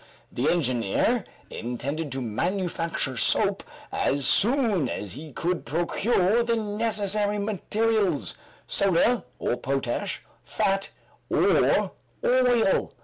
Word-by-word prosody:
The 125 - 0
engineer 145 - +1 0.3
intended 140 +6 -4
to 135 - -3
manufacture 165 - -2
soap - - +2 0.3
as 140 0 0
soon 215 - +3
as 100 - -5
he 150 +3 -9
could 175 +6 -2
procure 190 +5 +1
the 235 0 +1
necessary 210 -1 0
materials 210 -3 0 0.3
soda 200 +4 +2
or 120 - -1
potash, 130 -1 -2 0.2
fat 195 0 0 0.4
or - - +3 0.3
oil. 245 - +3
185 Hz, 95 wpm, -26 LUFS, 140-220 Hz, 0.4 s, soon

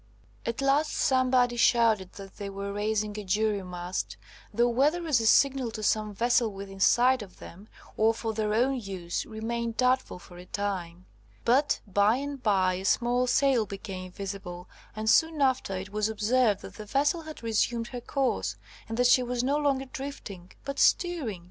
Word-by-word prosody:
At 230 +3 -2
last 285 +3 +2
somebody 255 -2 +2
shouted 225 -6 +3
that 195 -1 -11
they 200 -1 -5
were 200 0 -5
raising 210 0 -1
a - - -6
jury 205 +1 0
mast, 180 0 -5 0.3
though 240 +1 +2
whether 290 +8 +1
as 285 -8 +2
a 225 - +1
signal 270 0 +4
to 215 - -6
some 215 0 +1
vessel 235 +2 +1
within 195 0 -9
sight 250 +5 +4
of 195 -3 -11
them, 195 +5 -12 0.3
or 220 +1 +4
for 225 0 -4
their 215 -1 -1
own 255 +4 +1
use, 185 -5 -5
remained 230 +1 -4
doubtful 255 -5 +1
for 175 0 -14
a 180 - -11
time; 185 -3 -4 0.4
but 270 +5 +2
by 205 +2 +3
and 280 0 -5
by 190 -5 +2
a 185 +1 -5
small 245 +4 +2
sail 255 -4 +2
became 190 -2 -7
visible, 185 -2 -7 0.3
and 215 0 -4
soon 320 +6 +4
after, 260 -8 +1
it 190 +2 -7
was 210 +1 0
observed 220 0 +1
that - - -10
the 215 - -8
vessel 285 +8 +1
had 310 -5 -10
resumed 230 +1 0
her 245 -1 -6
course, 270 +1 -1 0.3
and 225 - -4
that 245 - +3
she 250 +1 +6
was 245 0 -2
no 280 +3 +1
longer 275 -2 0
drifting, 255 -10 -8
but 275 0 -4
steering! 320 - +2
225 Hz, 180 wpm, -28 LUFS, 200-255 Hz, 0.4 s, she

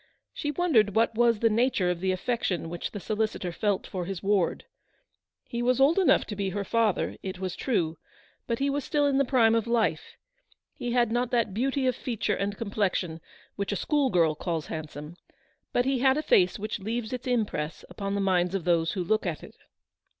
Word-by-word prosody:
She 295 - -3
wondered 270 - +2
what 230 +1 +3
was 235 0 +3
the 230 - +4
nature 215 -5 +2
of 175 - -3
the 190 +1 0
affection 185 -4 -1
which 175 - -4
the 205 - -6
solicitor 210 -2 -2
felt 200 +2 -1
for 180 -2 -4
his 190 0 -5
ward. 195 -3 +1 0.8
He 235 - -4
was 250 +1 +2
old 290 +7 +5
enough 375 - +4
to 210 - -6
be 200 -1 -1
her 200 +2 -3
father, 220 0 0
it 190 -1 -5
was 185 -1 -4
true, 170 - -1 0.5
but 230 - 0
he 275 - 0
was 280 0 -1
still 295 -2 +1
in 275 -1 +2
the 275 - +3
prime 235 -4 +4
of 230 0 +1
life; 235 -1 0 0.6
he 240 -1 -4
had 240 -2 +2
not 240 +1 0
that 230 -5 +1
beauty 265 +5 0
of 255 - +2
feature 235 -5 -2
and 200 +1 -2
complexion 195 -6 -1 0.4
which 200 0 -2
a - - 0
school 285 - +1
girl 165 -6 +3
calls 160 0 -3
handsome, 155 +1 -7 0.5
but 245 - +1
he 265 -1 +1
had 265 +2 +4
a 305 - -1
face 180 -9 +3
which 215 +1 -4
leaves 225 +3 -3
its 255 +1 -5
impress 210 -11 -1
upon 195 +2 -4
the 200 - 0
minds 185 -1 +1
of 190 - -2
those 165 -1 +2
who 190 -3 -2
look 215 +2 0
at 165 -3 -4
it. - - -11
210 Hz, 205 wpm, -27 LUFS, 185-245 Hz, 0.8 s, old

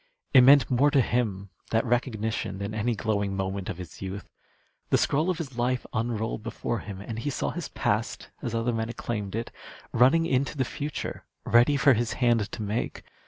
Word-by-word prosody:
It 130 - +9
meant 135 0 +7
more 130 +4 +4
to 145 -1 +3
him, 105 -7 0 0.2
that 115 +2 +1
recognition, 110 -4 -1
than 100 +2 -4
any 110 +2 0
glowing 100 -3 -1
moment 95 0 -3
of 85 - -4
his 90 -3 -10
youth. 95 +1 -5 0.6
The - - +4
scroll 155 +6 +1
of 180 - 0
his 135 -7 -6
life 125 +1 0
unrolled 110 -1 -2
before 115 +1 -3
him, 100 -2 -8
and 115 +2 -5
he 145 - -2
saw 140 - -2
his 175 -5 -5
past, 110 +3 -2
as 120 -4 -3
other 115 +1 0
men 110 0 -2
acclaimed 105 -4 -4
it, 115 +1 -3 0.4
running 145 +7 +5
into 140 +1 0
the 130 - +1
future 145 +2 -5 0.2
ready 120 +5 +5
for 140 +1 +6
his 120 0 0
hand 120 -4 +2
to 110 - -5
make. 105 +3 -3
115 Hz, 190 wpm, -27 LUFS, 105-130 Hz, 0.6 s, It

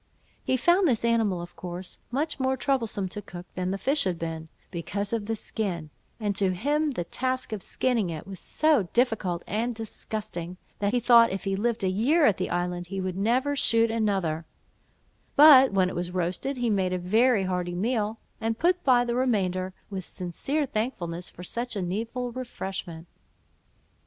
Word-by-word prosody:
He 260 - +1
found 350 +7 +4
this 235 -4 +1
animal 220 -7 +2
of 175 - -11
course 180 0 -6
much 290 +4 -1
more 265 0 +1
troublesome 230 -7 0
to 210 - -6
cook 175 -2 -9
than 185 0 -2
the 195 - -1
fish 275 +9 +1
had 180 -2 0
been, 160 -1 -5 0.2
because 200 +4 -3
of 215 -3 -2
the 225 - 0
skin; 180 -8 -4 0.3
and 205 -2 -1
to 190 -2 +1
him 290 - 0
the 175 - -2
task 255 +8 -2
of 210 - -4
skinning 230 -2 0
it 160 -2 -5
was 195 -2 -8
so 295 - +2
difficult 220 -8 +1
and 230 +4 -1
disgusting, 210 -5 -5 0.2
that 200 0 +1
he 245 - +2
thought 235 -1 +6
if 195 - -4
he 195 -1 0
lived 225 +2 -1
a - - +2
year 255 - +3
at 210 - +4
the 185 - -2
island, 175 0 -2
he 195 +2 -4
would 185 -1 -2
never 250 +8 +1
shoot 230 -4 +3
another; 190 -8 0 0.9
but 280 -3 +9
when 190 -2 +3
it 185 - -5
was 175 0 -2
roasted, 180 +9 -2
he 240 -2 0
made 190 -3 +1
a - - +1
very 215 +5 +3
hearty 180 -1 -2
meal, 220 +2 0 0.2
and 225 0 -1
put 355 +4 +2
by 245 -2 +4
the 240 - -1
remainder, 190 -7 0 0.2
with 190 -1 -4
sincere 225 - -2
thankfulness 180 -8 -3
for 180 - -11
such 235 +5 -3
a 200 - -1
needful 230 +7 -3
refreshment. 190 -9 -6
210 Hz, 180 wpm, -27 LUFS, 180-245 Hz, 0.9 s, but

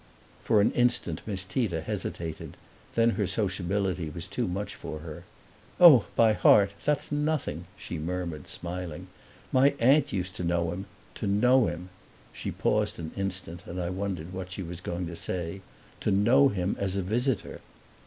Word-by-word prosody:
For 105 - +4
an - - +3
instant 120 -10 +1
Miss 95 -3 -1
Tita 95 -4 -1
hesitated; 80 0 -5 0.4
then 115 0 +4
her 105 -4 -1
sociability 95 -3 -1
was - - -6
too - - -2
much 95 +3 -3
for 75 0 -7
her. 80 -2 -9 0.5
"Oh, 150 - +9
by 115 -2 +5
heart 100 -1 +5
that's 150 0 0
nothing!" 145 - -1
she 85 - -6
murmured, 85 -2 -4
smiling. 90 -2 -6 0.4
"My 140 +2 +4
aunt 140 +4 +4
used 90 -3 -3
to - - -3
know 85 -1 0
him 95 +3 -6 0.3
to - - -4
know 125 +5 +4
him" 85 +3 -5 0.4
she - - -5
paused - - 0
an 80 -1 -6
instant 95 -3 -2
and 90 +2 -5
I 90 0 -2
wondered 95 -3 -4
what 95 0 -6
she 95 +1 -5
was 85 0 -7
going 85 0 -3
to 85 0 -6
say 85 +2 -4 0.4
"to - - -1
know 115 +8 +5
him 95 -2 -1
as 95 -1 -1
a 100 - 0
visitor." 120 +4 -1
95 Hz, 165 wpm, -28 LUFS, 85-110 Hz, 0.5 s, Oh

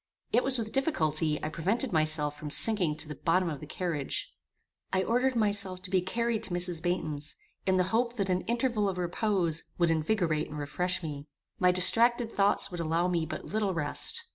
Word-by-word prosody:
It 240 - +3
was 265 -1 +4
with 220 -2 -4
difficulty 155 - +1
I 155 - -2
prevented 195 - -1
myself 155 -2 +1
from 150 0 -7
sinking 180 -2 +4
to 160 - 0
the 150 - -6
bottom 170 +2 0
of 145 - -6
the 150 - -10
carriage. 155 -4 -4 0.6
I 190 0 +1
ordered 250 +4 +1
myself 205 -4 +2
to 185 - -6
be 185 -1 +3
carried 230 +4 -1
to - - -3
Mrs. 175 -2 0
Baynton's, 155 -4 -2 0.3
in 190 0 +3
hope 225 +6 0
that 200 -4 -1
an 180 0 0
interval 235 -3 0
of 185 - -5
repose 175 -2 0
would 170 -1 +2
invigorate 160 -1 0
and 150 - -7
refresh 180 +5 -1
me. 145 -2 -6 0.3
My 180 - +4
distracted 230 +6 +4
thoughts 200 0 +2
would 175 - -6
allow 165 +2 0
me 170 -3 -1
but - - -6
little 205 -3 -1
rest. 150 -3 -1
180 Hz, 190 wpm, -29 LUFS, 160-215 Hz, 0.6 s, was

